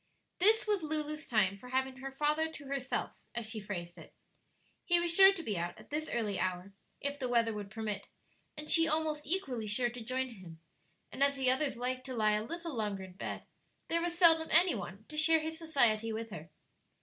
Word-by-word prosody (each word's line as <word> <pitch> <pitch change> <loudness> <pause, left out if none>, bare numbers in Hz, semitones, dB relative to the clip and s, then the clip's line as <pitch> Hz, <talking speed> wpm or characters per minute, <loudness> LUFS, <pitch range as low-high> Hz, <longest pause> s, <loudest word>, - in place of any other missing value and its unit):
This 435 +5 +4
was 415 -3 +1
Lulu's 305 0 -1
time 200 -5 +2
for 250 +5 -12
having 260 0 -1
her 270 +1 -6
father 300 +3 0
to 315 -2 -8
herself, 270 -1 -2 0.2
as 235 -2 -2
she 220 0 -4
phrased 175 -4 -6
it. - - -15 0.7
He 350 -1 +4
was 345 -1 +1
sure 385 +2 +8
to 370 -4 -6
be 205 - -2
out 175 +1 -4
at - - -16
this 310 +1 -3
early 215 -4 -2
hour, 185 +1 -3 0.3
if 285 +1 -4
the 255 -3 -2
weather 230 -2 +2
would 205 -1 -6
permit, 215 -2 -4 0.5
and 300 0 -7
she 330 0 +6
almost 310 -2 0
equally 270 - -1
sure 240 +3 0
to 245 0 -8
join 260 +3 -2
him: 185 -8 -12 0.5
and - - -8
as 280 0 +3
the 260 -2 +2
others 265 -1 0
liked 255 +2 -3
to 260 - -5
lie 215 -2 +3
a 210 0 +1
little 335 +5 -5
longer 205 -4 -2
in 185 -1 -11
bed, 190 - -6 0.4
there 335 0 +2
was 345 0 -2
seldom 325 -2 +6
any 360 -1 +6
one 200 0 -7
to 305 - -9
share 320 +1 +5
his 320 +1 -5
society 235 -9 +3
with 225 0 -5
her. 165 -3 -8
260 Hz, 210 wpm, -32 LUFS, 215-315 Hz, 0.7 s, sure